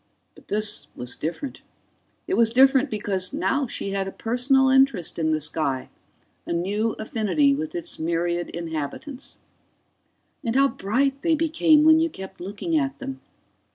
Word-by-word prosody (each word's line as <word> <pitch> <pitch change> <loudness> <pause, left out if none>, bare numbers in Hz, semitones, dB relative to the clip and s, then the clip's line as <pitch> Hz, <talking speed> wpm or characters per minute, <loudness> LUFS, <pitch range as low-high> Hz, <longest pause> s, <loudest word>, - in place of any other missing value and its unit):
But - - -19
this 210 0 +1
was 125 0 -4
different. 210 - -5 0.6
It 370 - -3
was 230 -7 +4
different 265 +3 +5
because 195 -3 -2
now 270 +8 0
she 200 - -4
had 195 -1 -1
a - - -4
personal 255 +5 +2
interest 265 -12 +2
in 160 -1 +1
the 155 0 +1
sky, 145 -3 -2 0.5
a - - -4
new 205 +6 0
affinity 225 +5 +1
with 310 +4 -4
its 345 -1 -5
myriad 170 +1 -1
inhabitants. 170 - -6 1.1
And 230 0 -2
how 275 +1 +5
bright 270 +8 0
they 330 -1 +2
became 315 -1 +3
when 315 0 +7
you 330 +1 +2
kept 190 - -10
looking 205 - -3
at 280 -3 0
them! 270 0 -7
230 Hz, 155 wpm, -24 LUFS, 185-280 Hz, 1.1 s, when